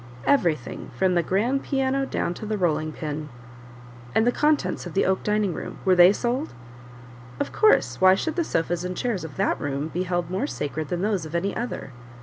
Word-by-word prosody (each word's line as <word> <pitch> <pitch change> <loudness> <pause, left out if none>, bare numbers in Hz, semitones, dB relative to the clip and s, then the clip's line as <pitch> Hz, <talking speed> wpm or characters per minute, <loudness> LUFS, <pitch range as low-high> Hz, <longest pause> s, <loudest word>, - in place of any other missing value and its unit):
"Everything 170 - +1
from 185 +4 +2
the 175 - +3
grand 225 - 0
piano 270 0 0
down 175 - -1
to 175 - -10
the 215 0 -1
rolling 155 -4 0
pin." 150 -1 -5 0.9
"And 220 - +4
the 245 - +4
contents 285 -13 +1
of 170 - -10
the 195 - +3
oak 190 0 +1
dining 210 -3 0
room - - -6
were 190 - +5
they 180 +1 +8
sold?" 245 +8 -2 0.8
"Of - - -2
course; 435 - +3
why 185 0 +7
should 320 +10 -2
the 345 - +1
sofas 170 - -1
and 180 0 -4
chairs 230 -8 -1
of 150 -4 -8
that - - 0
room 145 +2 -2
be 175 - -2
held 175 -2 -2
more 195 +10 -1
sacred 150 - -4
than 175 +3 -2
those 205 -5 0
of 155 - -7
any 195 +4 -1
other?" 240 - -4
185 Hz, 200 wpm, -25 LUFS, 165-235 Hz, 0.9 s, they